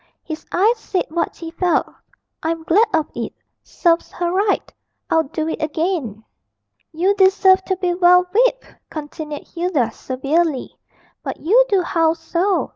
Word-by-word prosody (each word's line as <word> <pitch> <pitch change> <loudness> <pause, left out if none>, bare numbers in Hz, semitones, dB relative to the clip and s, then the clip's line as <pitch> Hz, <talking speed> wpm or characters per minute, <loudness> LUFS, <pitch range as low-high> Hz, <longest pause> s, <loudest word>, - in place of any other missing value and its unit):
His 315 -1 -7
eyes 440 +6 +2
said 380 -4 -2
what 335 +2 -2
he 330 -1 -8
felt 355 +1 +1 0.6
'I'm 325 0 -2
glad 410 +8 +4
of 315 -2 +1
it - - -5 0.3
serves 340 -1 0
her 345 -1 -1
right; 395 +2 0 0.4
I'd 320 -4 +2
do 315 -1 -2
it 320 - -3
again.' 310 - -2 0.7
'You 355 +5 +2
deserve 380 -1 +4
to 380 - 0
be 360 -1 0
well 360 0 +5
whipped,' - - +1 0.2
continued 300 -1 -7
Hilda, 335 -9 -1
severely; 275 +4 -1 0.5
'but - - -5
you 445 +10 +5
do 390 -3 +2
howl 330 -1 +2
so. 340 +4 -1
340 Hz, 145 wpm, -20 LUFS, 315-380 Hz, 0.7 s, well